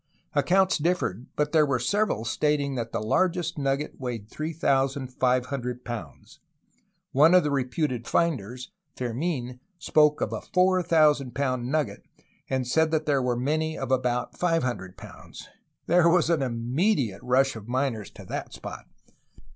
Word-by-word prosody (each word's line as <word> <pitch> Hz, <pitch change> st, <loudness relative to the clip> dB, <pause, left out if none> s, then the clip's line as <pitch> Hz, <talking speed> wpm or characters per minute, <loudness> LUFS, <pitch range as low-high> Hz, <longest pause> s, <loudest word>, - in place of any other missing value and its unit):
Accounts 190 Hz, -1 st, +3 dB
differed, 150 Hz, -, -1 dB
but 150 Hz, 0 st, 0 dB
there 155 Hz, -2 st, +5 dB
were 140 Hz, -3 st, +1 dB
several 125 Hz, -, 0 dB
stating 145 Hz, +3 st, 0 dB
that 115 Hz, -3 st, -4 dB
the -, -, -2 dB
largest 170 Hz, +8 st, 0 dB
nugget 140 Hz, +1 st, -2 dB
weighed 115 Hz, -5 st, -5 dB
3500 130 Hz, -4 st, -1 dB
pounds; 115 Hz, -11 st, -8 dB, 0.7 s
one 155 Hz, +6 st, +6 dB
of 180 Hz, -, +6 dB
the 150 Hz, -, -1 dB
reputed 130 Hz, -2 st, -1 dB
finders, 130 Hz, -, -1 dB, 0.3 s
Fermln, 125 Hz, 0 st, -3 dB, 0.2 s
spoke 150 Hz, -3 st, +3 dB
of -, -, -2 dB
a -, -, -4 dB
4000 165 Hz, -8 st, +2 dB
pound 130 Hz, -3 st, -1 dB
nugget, 155 Hz, -1 st, -1 dB, 0.5 s
and 130 Hz, -2 st, -1 dB
said 160 Hz, +5 st, +2 dB
that 155 Hz, -1 st, 0 dB
there 140 Hz, -3 st, +2 dB
were 125 Hz, -1 st, 0 dB
many 155 Hz, +5 st, -1 dB
of 135 Hz, -1 st, -4 dB
about 125 Hz, -1 st, 0 dB
500 130 Hz, -, -1 dB
pounds. -, -, -12 dB, 0.4 s
There 170 Hz, 0 st, +4 dB
was 170 Hz, -1 st, +3 dB
an 165 Hz, -4 st, +2 dB
immediate 125 Hz, -, 0 dB
rush 135 Hz, +1 st, +2 dB
of 110 Hz, -1 st, -9 dB
miners 125 Hz, -4 st, -1 dB
to -, -, -13 dB
the -, -, -5 dB
spot. -, -, -9 dB
135 Hz, 140 wpm, -26 LUFS, 125-160 Hz, 0.7 s, one